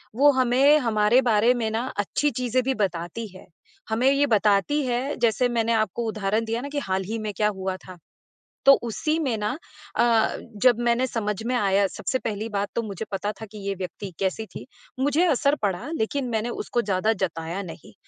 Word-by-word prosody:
वो 285 +4 +6
हमें 260 +3 +4
हमारे 225 -1 +3
बारे 230 +1 +4
में 230 -2 -1
ना 225 +2 -1 0.2
अच्छी 245 +8 +1
चीज़ें 250 +1 0
भी 265 +2 0
बताती 185 +1 -2
है, - - -12 0.4
हमें 235 +4 +3
ये 280 +1 +3
बताती 210 +8 +3
है 255 +3 -1
जैसे 240 +2 +2
मैंने 230 -1 +1
आपको 220 +1 0
उदाहरण 215 +1 -1
दिया 230 +1 -2
ना 280 - -6
कि 285 0 -2
हाल 190 -7 -2
ही 220 +4 -3
में 215 -1 -3
क्या 210 - +3
हुआ 190 0 -2
था 185 - -10 0.7
तो 275 - +10
उसी 305 +7 -1
में 260 -8 0
ना 210 0 -1 0.5
अ, 230 -2 +3 0.3
जब 245 -3 +5
मैंने 240 +2 +2
समझ 210 -4 -2
में 250 - 0
आया 200 -3 +3
सबसे 260 +6 -3
पहली 220 -1 -4
बात 205 -1 -2
तो 235 - 0
मुझे 210 0 -5
पता 205 +2 -2
था - - -4
कि 215 - -10
ये 200 - -1
व्यक्ति 190 +1 -6
कैसी 195 +3 -1
थी, 205 - -10 0.3
मुझे 290 +6 +2
असर 290 -3 +2
पड़ा 190 +5 -1
लेकिन 255 +4 -1
मैंने 225 0 -1
उसको 240 0 -2
ज़्यादा 200 +2 +1
जताया 165 +2 -5
नहीं 210 +7 -14
225 Hz, 195 wpm, -25 LUFS, 205-250 Hz, 0.7 s, तो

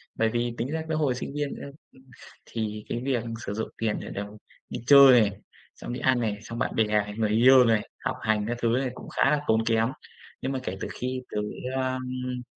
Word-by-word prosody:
Bởi 115 0 +2
vì 120 +1 -1
tính 120 - -2
ra 160 +2 -2
cái 155 - 0
hồi 145 -5 +1
sinh 130 - -5
viên 145 -1 -2
ấy, 140 - -8 0.2
ưm, 130 - -20 0.4
thì 105 -2 -4
cái 120 - -2
việc 125 -4 0 0.2
sử 100 - -3
dụng 110 +1 -3
tiền 110 -2 -1
để - - -7
được 100 - -4 0.4
đi - - -5
chơi 135 -4 +9
này, 105 - +2 0.4
xong - - -7
đi 125 - -4
ăn 130 -1 +2
này, 110 -3 -1
xong 115 +2 -7
bạn - - -1
bè, 110 - +4 0.3
người 110 -2 +1
yêu 125 +4 +7
này, 110 -2 +1 0.2
học - - 0
hành 110 -1 +1
các 120 +1 -2
thứ 120 - +2
này 125 +3 +1
cũng - - -10
khá 135 - +2
là 150 - +2
tốn 110 0 +2
kém. 115 0 +2 0.5
Nhưng 135 - -2
mà 135 - -2
kể 95 -3 -4
từ - - -2
khi 130 +1 -4
tớ, - - -3 0.4
a, 130 -1 0 0.3
ưm 125 -1 -4
120 Hz, 235 wpm, -26 LUFS, 110-130 Hz, 0.5 s, chơi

